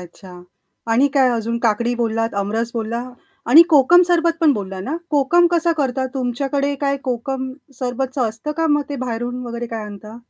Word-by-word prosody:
अच्छा. 180 +1 -13 0.5
आणि 260 +5 +4
काय 265 -2 +4
अजून? 230 0 -2
काकडी 235 +1 +1
बोललात, 225 -1 -1
अमरस 220 +4 -2
बोलला 230 +1 -3 0.5
आणि 315 +6 +10
कोकम 310 +5 +6
सरबत 340 -1 +3
पण 315 -3 +5
बोलला 195 -5 -5
ना? 270 +11 -3
कोकम 305 +4 +4
कसा 340 -1 +2
करतात, 265 -2 -1
तुमच्याकडे 275 +3 -1
काय 280 -1 0
कोकम 260 +1 -3 0.3
सरबतच 260 +2 -3
असतं 225 +8 -5
का? 325 - +1
मग 295 -1 +2
ते 285 - -4
बाहेरून 245 +1 -4
वगैरे 235 0 -5
काय 225 -2 -5
आणता? 210 +2 -10
250 Hz, 170 wpm, -20 LUFS, 225-280 Hz, 0.5 s, आणि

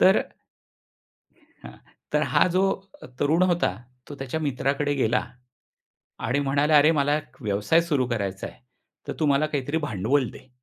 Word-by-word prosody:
तर 190 +2 +6 1.5
हां. - - -10 0.4
तर - - +2
हा - - +5
जो 185 +2 +1 0.6
तरुण 160 +5 +3
होता, 175 - +2 0.3
तो 145 - -7
त्याच्या 135 +4 -4
मित्राकडे 145 0 0
गेला 125 -3 +1 1.0
आणि 125 +4 +1
म्हणाला, 145 +2 +2
"अरे 150 +2 +6
मला 145 -1 +2
एक 150 - -14
व्यवसाय 105 +10 +2
सुरू 145 -7 0
करायचा 100 -6 -3
आहे, 60 - -12 0.5
तर - - -1
तू 155 - +2
मला 140 +2 +3
काहीतरी 145 0 -2
भांडवल 130 - 0
दे." - - -14
145 Hz, 145 wpm, -25 LUFS, 125-155 Hz, 1.5 s, तर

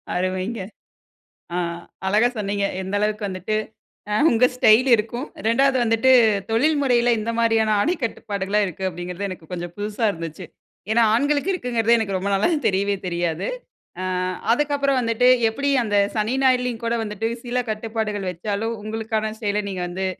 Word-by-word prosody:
அருமைங்க. 185 +4 -2 1.0
ஆ, - - 0 0.5
அழகா 215 +5 +4
சொன்னீங்க. 200 -1 -1 0.2
எந்த 190 +2 -6
அளவுக்கு 210 0 -1
வந்துட்டு, 185 +3 -3 0.6
அ, - - 0 0.2
உங்க 235 +2 +4
ஸ்டைல் 250 +2 +5
இருக்கும், 235 +6 -4 0.2
2வது 265 +3 +3
வந்துட்டு 225 +3 +3 0.4
தொழில் 295 +7 +3
முறைல 245 -3 +3
எந்த 225 +2 -2
மாரியான 225 -2 +3
ஆடைக் 330 - 0
கட்டுப்பாடுகள்லாம் 205 -2 -1
இருக்கு 190 +2 -4
அப்டிங்கிறது 180 +3 -5
எனக்கு 170 -4 -10
கொஞ்சம் 175 -1 -5
புதுசா 210 +2 -2
இருந்துச்சி. 165 0 -7 0.5
ஏன்னா, 235 +2 +4
ஆண்களுக்கு 285 +8 +1
இருக்குங்கிறது 235 - +1
எனக்கு 200 -4 -2
ரொம்ப 195 +2 -2
நாளா 195 - +2 0.2
தெரியவே 200 +1 +1
தெரியாது. 170 -1 -2 0.6
ஆ, - - -2 0.5
அதுக்கப்புறம் 280 0 +1
வந்துட்டு, 230 +1 +2 0.2
எப்புடி 280 +5 -1
அந்த 205 -1 0 0.2
சனி, 215 +4 0
ஞாயிறுலயும் 250 -2 +1
கூட 230 - 0
வந்துட்டு 210 +1 -3 0.2
சில 245 +1 -2
கட்டுப்பாடுகள் 215 -2 -3
வெச்சாலும், 210 +6 -3
உங்களுக்கான 220 0 -2
செயல 210 0 0
நீங்க 185 -1 -4
வந்து, 190 +2 -3
215 Hz, 145 wpm, -22 LUFS, 195-235 Hz, 1.0 s, ஸ்டைல்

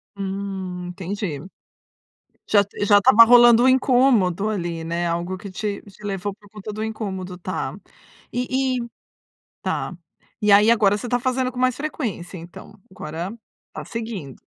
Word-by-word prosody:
Hum, 190 -2 -5
entendi. 185 -4 -4 1.1
Já 205 -1 +5
t 205 +1 -4
já 205 0 +6
estava 210 +3 +8
rolando 240 0 +7
um - - +5
incômodo, 245 - +3
ali, 170 -5 -3
né, 170 +1 -2
algo 170 +2 -2
que 200 +1 -9
te 200 +2 -4
te 200 +1 -17
levou 200 0 -3
por 205 -2 -21
conta 210 0 -8
do 215 - -4
incômodo. 190 -5 -5
Tá. 185 +1 -4 0.6
E 255 +1 0
e 235 - -6 0.8
tá. - - -2 0.5
E 210 -2 +4
aí 210 +3 +7
agora 210 -3 +4
você 240 +3 -6
tá 245 - +1
fazendo 255 +1 0
com 250 - -8
mais 255 -1 +2
frequência, 230 - -4
então? 170 +4 -12 0.2
Agora 170 +1 -6 0.4
tá - - -7
seguindo. 220 - -6
205 Hz, 155 wpm, -22 LUFS, 185-235 Hz, 1.1 s, estava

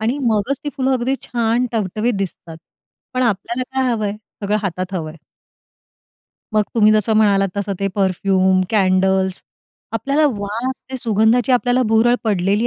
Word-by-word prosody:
आणि 235 +6 -1
मगच 225 +4 +1
ती 290 - -1
फुलं 265 0 +1
अगदी 255 +1 0
छान 235 +1 0
टवटवीत 220 +2 -1
दिसतात. 170 -4 -6 0.6
पण 255 - +1
आपल्याला 235 +3 -1
काय 260 -1 +1
हवंय? 210 -3 -1 0.3
सगळं 205 +1 +1
हातात 185 0 -3
हवंय. 160 -2 -4 1.4
मग 215 -1 +3
तुम्ही 215 -1 +5
जसं 215 +1 +2
म्हणालात 200 -2 +3
तसं 200 0 -2
ते 195 - +1
परफ्यूम, 190 -1 +2
कॅडल्स 190 -2 +2 0.5
आपल्याला 280 +7 +1
वास, 230 +2 -3
ते 260 - -3
सुगंधाची 230 +1 +2
आपल्याला 245 0 +2
भुरळ 225 +2 +4
पडलेली 205 +2 +1
215 Hz, 140 wpm, -19 LUFS, 195-245 Hz, 1.4 s, तुम्ही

